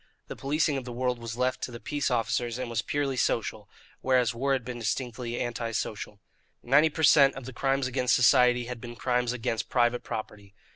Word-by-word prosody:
The - - -5
policing 145 +1 0
of 135 - -4
the 125 - -7
world 125 0 -1
was 115 0 -6
left 130 +1 0
to - - -3
the 120 - -8
peace 145 +3 -2
officers 120 -1 -1
and 125 -2 -4
was 115 -1 0
purely 140 -2 -1
social, 110 -3 -1 0.3
whereas 125 -3 +2
war 135 +4 0
had 130 -3 -1
been 125 -1 -6
distinctly 120 +1 -3
anti 120 -1 -3
social. 105 -2 -4 0.4
Ninety 145 +6 +4
per 160 +1 -4
cent. 140 -3 +6
of 135 - -8
the 130 - -8
crimes 135 +1 0
against 130 -1 +1
society 125 0 +4
had 120 -1 -7
been 120 0 -8
crimes 125 -1 0
against 115 -2 -3
private 120 -1 +1
property. 105 -2 -7
125 Hz, 200 wpm, -28 LUFS, 115-130 Hz, 0.4 s, cent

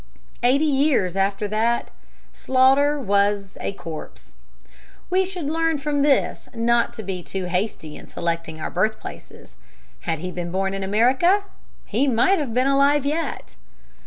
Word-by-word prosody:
Eighty 270 +5 +3
years 270 - +2
after 195 +1 0
that, 230 +3 0 0.4
Sloughter 270 +3 +3
was 200 -3 +1
a - - -2
corpse. 165 - -9 0.8
We 375 +1 +3
should 365 -4 -5
learn 325 +1 0
from 290 0 -1
this 280 -1 +1
not 235 +1 +2
to 220 - -7
be 185 -2 -4
too 190 +1 -5
hasty 180 -4 -3
in - - -12
selecting 165 -2 -3
our - - -4
birthplaces. 215 +5 -4 0.5
Had 165 - +1
he 180 +4 -5
been 175 -1 -5
born 195 +1 -1
in 195 - -3
America, 255 - +3 0.4
he 245 +7 0
might 265 +11 +3
have 280 -6 -3
been 250 +3 +1
alive 280 +1 +3
yet. 300 - -3
235 Hz, 145 wpm, -23 LUFS, 195-285 Hz, 0.8 s, Eighty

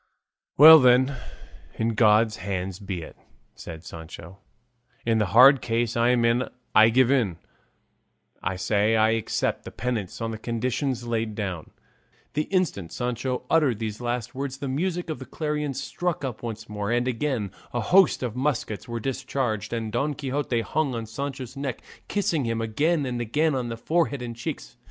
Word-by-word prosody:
"Well 160 +2 +11
then, 130 +1 +4 0.6
in 115 +1 0
God's 110 -1 +3
hands 95 0 -4
be 95 -4 -5
it," - - -11 0.4
said 80 -1 -9
Sancho; 85 +2 -10 0.7
"in 115 -1 +2
the 105 - +1
hard 130 +7 +7
case 115 0 -1
I'm 120 0 +3
in 120 +2 +1 0.2
I 110 +1 +7
give 130 +2 +4
in; 110 -11 +1 1.0
I 90 +2 -2
say 105 +3 +1
I 110 0 +4
accept 115 -1 -1
the - - -7
penance 115 -7 -4
on 115 -1 -3
the 110 - -6
conditions 125 +2 -2
laid 115 -2 -2
down." 95 -7 -4 0.6
The 150 +1 0
instant 160 - -1
Sancho 125 +1 -3
uttered 145 -8 +3
these 110 0 -5
last 120 -1 -3
words 135 0 -4
the 140 - -5
music 170 +5 -2
of 155 - -5
the 130 - -8
clarions 150 -2 -3
struck 175 -4 -3
up 125 -4 -5
once 115 -1 -6
more, 105 -1 -4
and 120 +1 +1
again 125 -5 -1 0.2
a 120 - -2
host 180 - +4
of 120 -3 -3
muskets 125 -6 -2
were 120 -1 -4
discharged, 125 -4 -2
and 115 -2 -3
Don 140 +6 -1
Quixote 135 -3 -1
hung 140 +1 -1
on 115 -1 -4
Sancho's 130 +2 -6
neck 135 -3 -4 0.2
kissing 170 -9 0
him 115 0 -1
again 145 +8 0
and 120 -2 -3
again 150 +7 +1
on 125 -3 -2
the 115 - -5
forehead 145 -1 0
and 120 -1 -6
cheeks. 60 - -6
120 Hz, 170 wpm, -25 LUFS, 110-135 Hz, 1.0 s, Well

